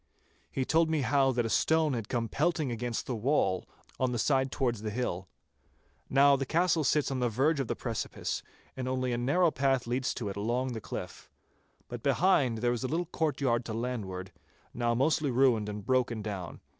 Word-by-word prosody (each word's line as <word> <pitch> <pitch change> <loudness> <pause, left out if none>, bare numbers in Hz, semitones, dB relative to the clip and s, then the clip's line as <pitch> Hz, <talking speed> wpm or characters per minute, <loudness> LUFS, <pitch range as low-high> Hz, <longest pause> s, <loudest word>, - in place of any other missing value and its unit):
He 130 - -2
told 160 +3 +3
me 160 -2 +1
how 135 +1 +3
that 120 -2 0
a - - -1
stone 160 -2 +2
had 115 -4 -4
come 115 -2 -1
pelting 155 +1 0
against 120 0 -3
the 125 - -3
wall, 110 -6 +1 0.3
on 130 -1 +1
the 120 - -1
side 130 +2 +1
towards 120 -6 -1
the 110 - -3
hill. 100 -5 -3 0.8
Now 140 +1 +6
the 135 - -1
castle 165 +3 +2
sits 150 0 +2
on 130 - -1
the 125 -1 +1
verge 140 +7 +1
of 135 - -1
the - - -2
precipice, - - -3 0.3
and 130 -1 -4
only 130 -1 -1
a - - 0
narrow 160 +7 +3
path 135 -2 +1
leads 125 +2 -1
to 115 - -4
it 100 - -5
along 120 +5 -1
the 110 - -5
cliff. - - -7 0.6
But - - -7
behind 145 -10 +3
there 120 +1 +1
is 120 - -4
a - - 0
little 165 +5 -1
courtyard 140 -7 0
to 110 - -4
landward, 100 -6 -4 0.4
now 120 -1 0
mostly 145 +3 +2
ruined 120 -4 +3
and 105 -1 -6
broken 120 -4 +1
down. 100 -5 -6
125 Hz, 195 wpm, -30 LUFS, 115-140 Hz, 0.8 s, Now